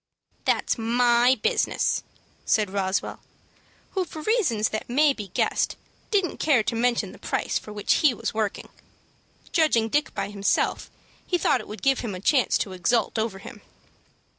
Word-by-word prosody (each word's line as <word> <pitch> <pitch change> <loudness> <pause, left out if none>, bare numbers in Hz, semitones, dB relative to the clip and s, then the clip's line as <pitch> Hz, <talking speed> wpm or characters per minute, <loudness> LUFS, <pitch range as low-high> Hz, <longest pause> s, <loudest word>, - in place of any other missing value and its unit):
"That's - - +1
my 240 +2 +3
business," - - +1 0.4
said 210 -4 +1
Roswell, 195 -1 -2 0.7
who, 380 - 0
for 315 -3 -9
reasons 310 - +1
that 215 - -5
may 285 +3 +4
be 210 -6 -7
guessed, - - 0 0.3
didn't 390 -6 0
care 275 -8 +3
to 230 - -2
mention 240 +1 +1
the - - -14
price - - -1
for 210 - -11
which 210 -1 +1
he 305 -4 +5
was 235 - -4
working. 215 -2 -3 0.8
Judging 240 -9 +2
Dick 295 +4 0
by 200 0 -3
himself, 200 -1 0 0.4
he 360 - +1
thought 260 -7 +2
it - - -13
would 210 - -9
give 270 -1 +3
him 215 -6 -4
a - - -6
chance 255 +6 +2
to 195 - -3
exult 220 +5 0
over 220 -3 -2
him. 195 - -11
235 Hz, 165 wpm, -25 LUFS, 210-280 Hz, 0.8 s, he